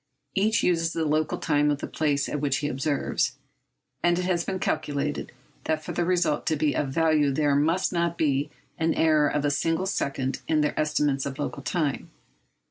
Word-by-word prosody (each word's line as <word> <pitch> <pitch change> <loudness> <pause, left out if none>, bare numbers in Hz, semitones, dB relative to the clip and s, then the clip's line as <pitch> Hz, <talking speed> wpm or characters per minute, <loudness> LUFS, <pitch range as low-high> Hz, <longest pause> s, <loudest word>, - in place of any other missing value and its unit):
Each 215 +2 +2
uses 165 -2 +1
the 165 -1 -1
local 155 0 0
time 150 -1 +2
of 145 - +1
the - - -5
place 145 -3 0
at 150 - -3
which 140 -2 +1
he 145 - -2
observes, 140 +1 -1 0.7
and 175 0 +3
it 180 - -1
has 175 -2 +1
been 190 - -3
calculated 150 -4 -2 0.3
that 155 -1 -1
for - - -5
the 175 - 0
result 175 -4 +1
to 160 - +2
be 150 -1 +1
of 140 - 0
value 155 -1 +2
there 145 +1 +2
must 165 +7 +1
not 170 -1 0
be 145 -2 +1 0.3
an 160 0 +1
error 155 -2 +4
of 145 0 -1
a 145 - +2
single 165 +5 0
second 135 -8 -2
in 155 -1 +2
their 150 - +1
estimates 145 -3 0
of 135 0 -6
local 145 -1 -4
time. 145 -2 -2
150 Hz, 195 wpm, -26 LUFS, 145-165 Hz, 0.7 s, error